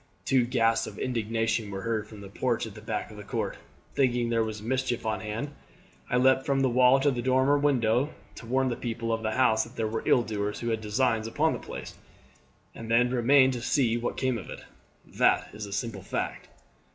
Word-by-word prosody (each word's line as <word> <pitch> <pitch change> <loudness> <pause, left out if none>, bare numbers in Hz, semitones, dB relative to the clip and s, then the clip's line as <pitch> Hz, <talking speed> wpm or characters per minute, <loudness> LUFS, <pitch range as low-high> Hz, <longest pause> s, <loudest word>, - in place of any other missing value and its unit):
Two 130 -3 +3
gasps 115 -2 +2
of - - -9
indignation 115 -2 -1
were 95 -1 -5
heard 110 -2 -2
from 105 -1 -11
the 100 - -9
porch 120 +4 -1
at 110 - -9
the 110 - -11
back 110 0 -4
of 105 - -11
the 105 - -8
court. - - -3 0.4
"Thinking 125 -3 +1
that - - -1
there 115 -1 +3
was 110 -1 -4
mischief 125 +1 -2
on 110 -1 -1
hand 110 +7 -4 0.6
I 125 - +2
leapt 130 +1 +4
from 135 -1 +1
the 130 - +3
wall 125 +2 +5
to 145 +1 +3
the 125 -2 -2
dormer 130 +3 +3
window 135 -2 +2 0.2
to 115 - -11
warn 130 +2 +1
the 120 - -2
people 115 -1 -3
of 115 - -2
the 110 -1 -1
house 110 -3 +3
that 115 +2 -13
there 110 -2 -1
were 110 +1 -3
ill 120 - +5
doers 105 -2 -3
who 120 - -2
had 110 -1 -1
designs 110 +1 0
upon 115 - +1
the - - -4
place, - - -8 0.8
and 115 -1 -9
then 125 +2 +3
remained 130 +2 +4
to 120 - -4
see 120 -2 +2
what 120 0 -3
came 130 -3 0
of - - -10
it. - - -8 0.4
That - - +2
is 105 0 -6
the 100 - -10
simple 100 0 -3
fact." - - -4
115 Hz, 225 wpm, -28 LUFS, 110-130 Hz, 0.8 s, wall